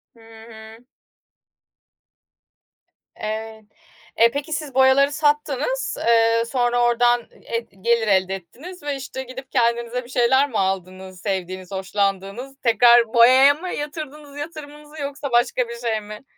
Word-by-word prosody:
Hı - - -21
hı. 225 0 -14 2.3
Evet. 220 0 -6 0.6
Eee, 230 0 +6
peki, 290 +2 -4
siz 300 -4 -4
boyaları 265 +2 +5
sattınız, 295 - -1
eee, 230 0 +4
sonra 245 -1 0
oradan, 240 0 +2
eee, 230 - -3
g 230 -4 -19
gelir 235 -1 +1
elde 190 -1 +2
ettiniz 290 - -12
ve, 290 -1 -2
işte, 265 0 -6
gidip 260 +1 -10
kendinize 235 0 0
bir 240 - -15
şeyler 265 +3 +3
mi 225 - -3
aldınız 185 -1 -4
sevdiğiniz, 185 -2 -4
hoşlandığınız? 195 +6 -3
Tekrar 235 0 +5
boyaya 255 +4 +7
mı 355 +5 -7
yatırdınız 295 -1 -7
yatırımınızı 295 -1 -9
yoksa 280 -1 -5
başka 240 0 +1
bir 235 - -6
şey 225 -3 -2
mi? 210 +3 -10
240 Hz, 130 wpm, -22 LUFS, 220-280 Hz, 2.3 s, boyaya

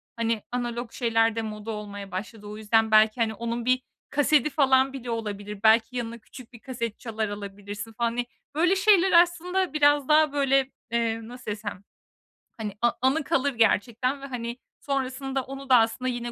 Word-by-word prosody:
hani, 230 -2 -1
analog 240 -1 -3
şeyler 225 -2 +1
de 225 - -1
moda 215 0 -6
olmaya 205 -2 -7
başladı. 210 +3 -6
O 210 +1 -7
yüzden 220 +1 +2
belki, 215 +2 +5
hani, 220 -1 +1
onun 235 +2 -4
bir 255 +1 +2 0.3
kasedi 290 0 +3
falan 270 -2 +3
bile 250 -3 -7
olabilir, 210 -3 -4
belki 225 +3 +4
yanına 235 -1 -4
küçük 245 +2 -14
bir 235 - -12
kaset 235 -3 -5
çalar 220 -3 -3
alabilirsin, 205 +1 -7
hani. 235 +1 0 0.3
Böyle 350 +5 +3
şeyler 385 -2 +4
aslında 355 +1 -1
biraz 290 -2 +3
daha 305 -1 +4
böyle, 275 -1 +2 0.2
eee, 230 -1 0
nasıl 245 -2 -7
desem, 205 -2 -6 0.7
hani, 215 -3 -4
a 240 0 +4
anı 270 +5 +2
kalır 280 0 0
gerçekten 240 +4 +1
ve, - - -7
hani, 240 -3 -5 0.2
sonrasında 270 -1 -2
onu 270 +1 -9
da 255 - +7
aslında 230 +3 +1
yine 240 -1 -4
235 Hz, 170 wpm, -26 LUFS, 220-270 Hz, 0.7 s, da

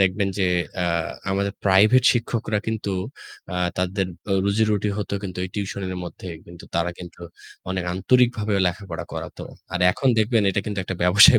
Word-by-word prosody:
দেখবেন 95 +1 +2
যে 95 - +3 0.4
আ - - +1 0.5
আমাদের 100 +1 0
প্রাইভেট 105 +6 +6
শিক্ষকরা 115 -3 -1
কিন্তু 110 -2 -2 0.6
আ - - -3 0.2
তাদের 95 +1 0 0.2
ও - - +3
রুজি-রুটি 105 0 +2
হতো 105 - -4
কিন্তু 95 -2 -5
এই 90 - -6
টিউশনের 95 -2 -3
মধ্যে, 90 - -9 0.2
কিন্তু 85 0 -12
তারা 85 +1 +1
কিন্তু 90 -1 -10 0.5
অনেক 95 -1 -1
আন্তরিকভাবেও 110 0 +2
লেখাপড়া 90 -2 -3
করাতো। - - -6 0.3
আর 90 - -1
এখন 135 - 0
দেখবেন 110 0 +3
এটা 100 - 0
কিন্তু 105 -2 -4
একটা 95 - -4
ব্যবসায় 105 +6 +8
100 Hz, 160 wpm, -23 LUFS, 95-110 Hz, 0.6 s, ব্যবসায়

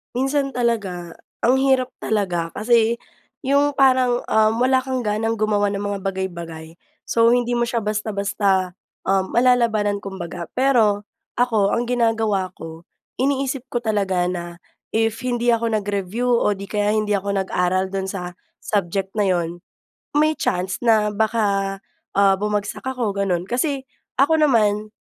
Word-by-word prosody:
Minsan 270 +1 0
talaga, 200 -8 -1 0.3
ang 255 +3 +4
hirap 260 -2 +2
talaga. 180 -6 -1
Kasi 230 +1 +3 0.5
yung 280 +1 +2
parang, 255 -2 +3
uhm, 220 0 +3
wala 260 +1 +4
kang 260 -1 -3
ganang 220 +1 0
gumawa 210 -1 +1
ng 200 0 -3
mga 205 -1 -2
bagay-bagay. 170 -4 -5 0.3
So, 230 0 +4
hindi 245 0 +1
mo 240 - +1
siya 235 - 0
basta-basta, 200 -3 0 0.4
uhm, 190 0 +1
malalabanan 230 -5 +3
kumbaga. 175 -3 -6
Pero, 225 -6 +3 0.4
ako 220 -5 +2
ang 240 - 0
ginagawa 225 -6 +1
ko, 165 +1 -9 0.4
iniisip 270 -1 -1
ko 240 - 0
talaga 195 -5 0
na 175 -1 -6 0.4
if 225 0 +1
hindi 240 -1 +1
ako 230 0 +1
nag-review 205 +1 -2
o 210 -3 +2
'di 200 - -7
kaya 210 +1 0
hindi 210 -1 0
ako 200 0 -1
nag-aral 185 +1 0
do'n 190 0 -2
sa 180 -2 -5 0.2
subject 195 -1 -2
na 205 -2 +1
'yon, 175 -1 -1 0.5
may 305 +1 +4
chance 185 +1 -1
na 220 -3 +3
baka, 205 -2 0 0.4
ah, 195 -1 +5
bumagsak 210 0 -2
ako 250 -5 -1
gano'n. 185 -3 0
Kasi, 270 +2 -1 0.3
ako 290 +4 +4
naman 215 -7 +2
210 Hz, 140 wpm, -21 LUFS, 195-245 Hz, 0.5 s, ah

